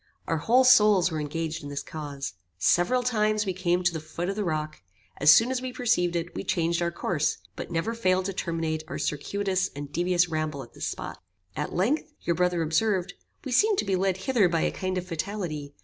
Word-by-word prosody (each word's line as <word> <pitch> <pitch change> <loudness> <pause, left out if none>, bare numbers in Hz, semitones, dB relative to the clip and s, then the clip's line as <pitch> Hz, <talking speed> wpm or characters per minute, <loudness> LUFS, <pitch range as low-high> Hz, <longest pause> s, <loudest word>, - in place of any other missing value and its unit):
Our 165 - 0
whole 245 - +4
souls 210 -7 +6
were 160 - -2
engaged 160 +2 -3
in 145 - -7
this 140 0 -4
cause. 145 -5 -6 0.2
Several 175 - +3
times 215 -3 +1
we 190 - -1
came 180 0 0
to 175 -1 +2
the 160 - -3
foot 165 +3 -5
of 195 - -2
the 210 - -1
rock; 155 -3 -3 0.4
as 145 - +4
soon 225 +11 +7
as 255 -1 -1
we 255 0 -4
perceived 225 -9 +1
it, 170 0 -3
we - - -4
changed 170 0 0
our 170 - +1
course, 170 -2 -1 0.2
but - - -6
never 170 +7 -1
failed 185 -5 +1
to 195 - -2
terminate 165 -3 -2
our - - -5
circuitous 190 +4 -1
and 145 0 -7
devious 175 +1 +2
ramble 155 -4 -3
at 120 - -16
this - - -4
spot. - - -6 0.3
At 150 - -3
length 270 - 0
your 170 - 0
brother 180 -1 +1
observed, 180 +3 +1 0.3
'We 265 - -4
seem 415 - +4
to 375 - -1
be 195 -1 +1
led 190 0 +1
hither 205 -1 +2
by 165 -1 +1
a - - +1
kind 185 0 -3
of 180 - -3
fatality. 160 -4 -4
175 Hz, 215 wpm, -27 LUFS, 160-205 Hz, 0.4 s, soon